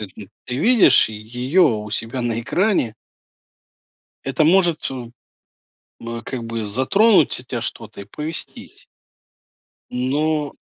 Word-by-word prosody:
м 100 -3 -9 0.2
ты 125 - -4
видишь 230 - +5
ее 125 - -1
у 105 -8 +1
себя 115 +4 -2
на 115 -1 -1
экране 175 - 0 1.3
это 135 +3 0
может, 170 0 +3
ту 125 -3 -6 0.9
ну, 115 0 -6
как 125 -3 -5
бы 115 -1 -4
затронуть 155 - +3
у - - -12
тя 120 -2 -5
что-то 110 -3 -5
и - - -10
повестись. 150 +10 -7 1.1
Но 145 +4 -1
125 Hz, 120 wpm, -20 LUFS, 115-155 Hz, 1.3 s, видишь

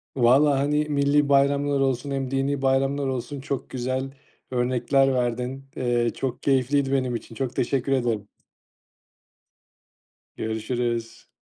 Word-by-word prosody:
Valla, 135 +3 +4
hani, 150 +2 +1
milli 145 0 +2
bayramlar 140 0 +3
olsun, 135 +1 0
hem 135 -1 -2
dini 135 +1 0
bayramlar 135 +1 +1
olsun, 130 +2 -4
çok 135 -1 -4
güzel 130 +1 -2 0.4
örnekler 130 +2 +2
verdin. 125 +2 -2
Eee, 120 -1 +1
çok 125 -2 -4
keyifliydi 135 0 +2
benim 130 -3 0
için. 115 0 -8
Çok 130 0 -3
teşekkür 135 +2 0
ederim. 120 -6 0 2.1
Görüşürüz. 115 +1 -3
135 Hz, 115 wpm, -24 LUFS, 125-140 Hz, 2.1 s, Valla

